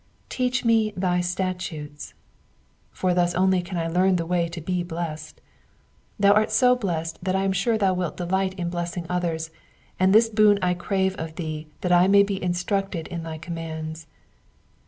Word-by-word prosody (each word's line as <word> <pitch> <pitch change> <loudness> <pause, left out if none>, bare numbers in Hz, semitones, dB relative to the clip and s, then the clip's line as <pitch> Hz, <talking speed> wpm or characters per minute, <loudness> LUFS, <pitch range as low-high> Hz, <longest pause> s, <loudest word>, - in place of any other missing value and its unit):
*^ - - -38 0.3
Teach 255 0 -1
me 225 -2 +3
thy 180 -1 +1
statutes^''; 180 -5 -4 0.8
for 185 -1 -1
thus 175 0 +1
only 185 0 +3
can 175 +1 -6
I 165 - -1
learn 185 +3 +2
the 170 -2 -1
way 175 0 0
to 170 +1 -7
be 180 +3 -2
blessed. 165 -3 -6 0.8
Thou 200 0 +6
art 215 +1 +3
so 250 +3 +4
blessed 165 -8 -3
that 185 +1 0
I 190 - +1
am 195 - +1
sure 220 +4 +1
thou 195 -3 +2
wilt 180 -4 -3
delight 185 +1 -1
in 175 -2 -3
blessing 175 0 -4
others, 165 -3 -2 0.5
and 185 +1 +4
this 220 +3 +6
boon 215 -2 +4
I 180 -1 +1
crave 190 +1 0
of 160 0 -6
thee 155 -2 -5
that 180 - -1
I 175 +1 +6
may 200 +1 +6
be 200 -1 -3
instructed 180 0 -2
in 170 -2 -4
thy 160 -1 -6
commands. 160 -1 -6
180 Hz, 180 wpm, -24 LUFS, 165-195 Hz, 0.8 s, Thou